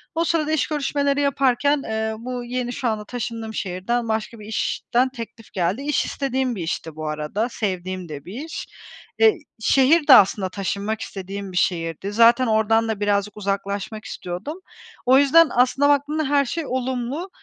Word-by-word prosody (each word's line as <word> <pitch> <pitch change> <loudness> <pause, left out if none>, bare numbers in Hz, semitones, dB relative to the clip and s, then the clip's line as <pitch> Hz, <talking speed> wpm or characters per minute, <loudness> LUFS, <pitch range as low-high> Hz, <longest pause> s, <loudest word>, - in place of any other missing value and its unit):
O 330 - +2
sırada 315 -2 0
iş 315 - +1
görüşmeleri 285 -1 0
yaparken, 280 +1 +2
eee, 220 0 -2
bu 245 +1 -5
yeni, 245 0 -3
şu 250 - -2
anda 215 -2 -2
taşındığım 230 -1 -5
şehirden 205 +6 -2
başka 220 +1 -3
bir 210 - -10
işten 245 +3 0
teklif 230 -3 -10
geldi. 185 +7 0
İş 295 +1 0
istediğim 265 -2 -1
bir 185 - -4
işti 160 -1 -4
bu 155 0 -5
arada, 155 +10 -2
sevdiğim 185 -4 -4
de 145 -2 -8
bir 235 - -6
iş. 325 - -6 0.6
E, 440 -1 +8 0.3
şehir 285 +7 +4
de 280 - +10
aslında 195 -4 +5
taşınmak 200 +3 -3
istediğim 195 0 -6
bir 180 - -5
şehirdi. 170 +2 -1
Zaten 235 +3 +5
oradan 225 +1 +2
da 220 -2 -2
birazcık 205 0 0
uzaklaşmak 200 +2 -3
istiyordum. 205 - -6 0.5
O 255 +1 +6
yüzden 295 +3 +6
aslında 255 +3 +3
baktığımda 290 +2 +1
her 285 -1 +3
şey 310 +4 -3
olumlu. 260 +6 -3
230 Hz, 165 wpm, -22 LUFS, 200-275 Hz, 0.6 s, de